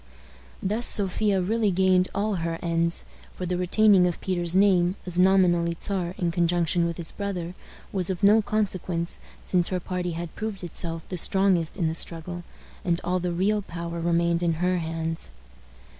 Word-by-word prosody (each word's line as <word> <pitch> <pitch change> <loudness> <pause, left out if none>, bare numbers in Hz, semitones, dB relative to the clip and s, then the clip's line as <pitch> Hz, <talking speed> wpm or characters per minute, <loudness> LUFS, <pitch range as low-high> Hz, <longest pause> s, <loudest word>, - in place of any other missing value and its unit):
Thus 215 +5 +2
Sophia 200 0 +4
really 215 +3 +1
gained 185 0 +3
all 205 0 0
her 165 0 -3
ends; 170 0 +2 0.3
for 180 - -5
the 180 0 -2
retaining 185 +1 +4
of 175 - -3
Peter's 175 -2 -1
name, 185 -2 +3
as 180 -1 -2
nominally 175 -3 +3
Czar 185 -3 -2
in 175 -2 -1
conjunction 170 0 +1
with 170 - -5
his 170 - -2
brother, 180 -4 -4 0.4
was 185 -3 0
of 190 +1 -4
no 210 +2 +6
consequence, 185 -5 -2 0.3
since 180 -2 +2
her 185 - -2
party 180 -1 -4
had 170 0 -6
proved 215 -3 -5
itself 165 -1 -4
the 180 - -5
strongest 185 -2 +2
in 170 -5 0
the 160 - -1
struggle, 170 +1 -3 0.4
and 170 -1 0
all 180 +1 0
the 180 0 -2
real 200 +5 0
power 170 -2 -6
remained 170 0 +1
in 170 -1 +1
her 180 +2 0
hands. 165 - -3
180 Hz, 170 wpm, -25 LUFS, 170-190 Hz, 0.4 s, no